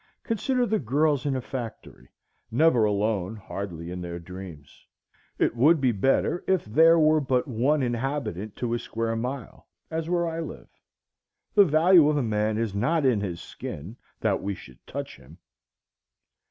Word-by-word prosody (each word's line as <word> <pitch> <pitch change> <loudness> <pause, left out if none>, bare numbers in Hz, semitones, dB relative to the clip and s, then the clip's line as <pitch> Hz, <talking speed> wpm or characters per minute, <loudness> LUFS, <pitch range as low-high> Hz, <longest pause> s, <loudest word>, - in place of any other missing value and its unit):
Consider 250 +2 0
the 220 -1 0
girls 145 +2 +1
in 135 - 0
a 130 - -2
factory,—never 125 +1 -2
alone, 105 -1 0
hardly 95 -5 -6
in 90 0 -5
their 85 -1 -5
dreams. 85 -4 -11 0.5
It - - +1
would 150 +7 +5
be 130 -2 +3
better 135 - +1
if 190 -2 +2
there 160 +10 +5
were 155 -1 +4
but 130 -1 0
one 135 +4 +1
inhabitant 120 - -3
to 120 -2 -2
a 120 - 0
square 115 0 -3
mile, 125 +1 -5 0.2
as 160 0 -3
where 175 -1 +1
I 165 0 -3
live. 165 - -7 0.8
The 205 -2 +7
value 160 0 +5
of 150 - +1
a 140 - +1
man 105 -1 0
is 115 -3 -1
not 145 +9 +1
in 120 -6 +3
his 90 -4 -4
skin, 85 +10 -8 0.3
that - - +1
we 100 +1 -3
should 65 -7 -14
touch - - -6
him. 70 +5 -16
120 Hz, 160 wpm, -26 LUFS, 100-155 Hz, 0.8 s, The